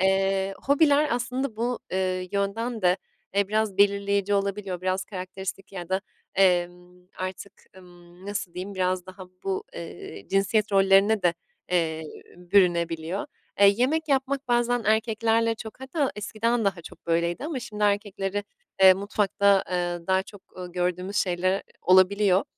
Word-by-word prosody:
Eee, 195 0 +1
hobiler 290 +1 +4
aslında 250 0 -2
bu, 240 +1 -1
eee, 185 -1 -1
yönden 215 +3 -2
de, 180 +1 +4 0.4
e, 200 -1 +2
biraz 215 -2 0
belirleyici 200 0 +2
olabiliyor. 200 -2 -2
Biraz 185 0 -1
karakteristik 190 0 -7
ya 175 -2 -7
da, 190 +1 0 0.3
emm, 180 -1 +1
artık, 185 +1 -6 0.2
ımm, 175 0 -16
nasıl 205 -4 -4
diyeyim 190 +2 -6
biraz 185 -1 -1
daha 185 0 -10 0.2
bu, 190 -1 -2
eee, 165 -11 -9
cinsiyet 200 +2 +1
rollerine 195 +2 +4
de, 175 -1 +3 0.4
eee, 160 -3 0 0.3
bürünebiliyor. 175 -1 +1 0.3
Eee, 200 - +8
yemek 310 +6 +1
yapmak 275 0 0
bazen 240 0 +2
erkeklerle 225 +1 +2
çok, 220 +2 -10
hatta 270 +1 -1
eskiden 225 +2 -1
daha 190 -4 -1
çok - - -13
böyleydi 170 - 0
ama 300 -5 -3
şimdi 210 -2 -3
erkekleri, 205 -1 -1 0.4
eee, 190 -1 +9
mutfakta, 200 0 -1 0.2
aaa, 175 -1 -2
daha 190 0 +2
çok, 200 0 -14
ııı, 180 -1 -7
gördüğümüz 180 +2 -2
şeyler 185 +1 +1 0.2
olabiliyor. 190 +1 +4
195 Hz, 140 wpm, -26 LUFS, 185-215 Hz, 0.4 s, eee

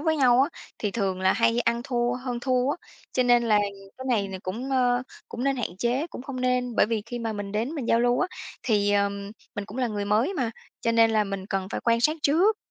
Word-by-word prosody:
với 315 0 +1
nhau 255 -2 +5
á, 285 - +1 0.3
thì 210 - -1
thường 195 -4 -1
là 190 0 +4
hay 230 +1 +2
ăn 235 0 +1
thua, 240 -2 0
hơn 250 -1 -4
thua 255 +1 +1
á, - - -1 0.4
cho 255 - +2
nên 245 -1 +4
là 215 -3 +4 0.4
cái 260 - -6
này 205 -5 +1
là 190 -1 -6
cũng, 235 +9 -4
ờ, 245 -1 +2 0.3
cũng 245 +3 -4
nên 275 -1 +2
hạn 210 -7 -3
chế, 250 +7 0
cũng - - -9
hông 265 -3 -5
nên. 250 -1 0
Bởi - - +5
vì 220 -2 -1
khi 240 +1 -5
mà 225 -1 -2
mình 205 -1 -5
đến 225 +6 -1
mình 265 -6 -4
giao 230 - +4
lưu 245 +1 +2
á, 370 - +2 0.4
thì, 205 -3 +2
ờm, 200 0 0 0.2
mình 205 -2 -3
cũng 215 +6 -8
là 250 -2 +1
người 205 -1 -2
mới 220 - +2
mà, 250 -7 -1 0.3
cho 230 - +1
nên 230 0 +5
là 215 -1 +3
mình 195 -1 -5
cần 195 -2 -2
phải - - -3
quan 230 0 +3
sát 305 +6 +3
trước. 365 +9 +4
235 Hz, 255 wpm, -26 LUFS, 210-255 Hz, 0.4 s, nhau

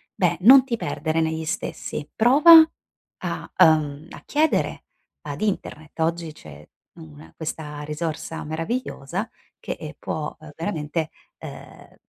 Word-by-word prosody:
beh, - - +1
non 260 +7 +9
ti 245 -3 -3
perdere 160 -6 -2
negli 160 0 -2
stessi, 155 -3 -4
prova 300 +8 +8 0.6
a - - -5
uhm, 155 -1 +2
a - - -10
chiedere 310 +2 0 0.4
ad - - -6
internet. 165 -7 -4
Oggi 165 0 -1
c'è 75 - -13 0.4
una 80 0 -13
questa 150 -2 -6
risorsa 155 +2 -4
meravigliosa 170 - -4 0.3
che, - - -6
ehm, 155 0 -7
può, 150 -1 -4
uhm, 155 -1 -12
veramente, 160 -2 -3 0.3
ehm, - - -12
160 Hz, 125 wpm, -23 LUFS, 150-205 Hz, 0.6 s, non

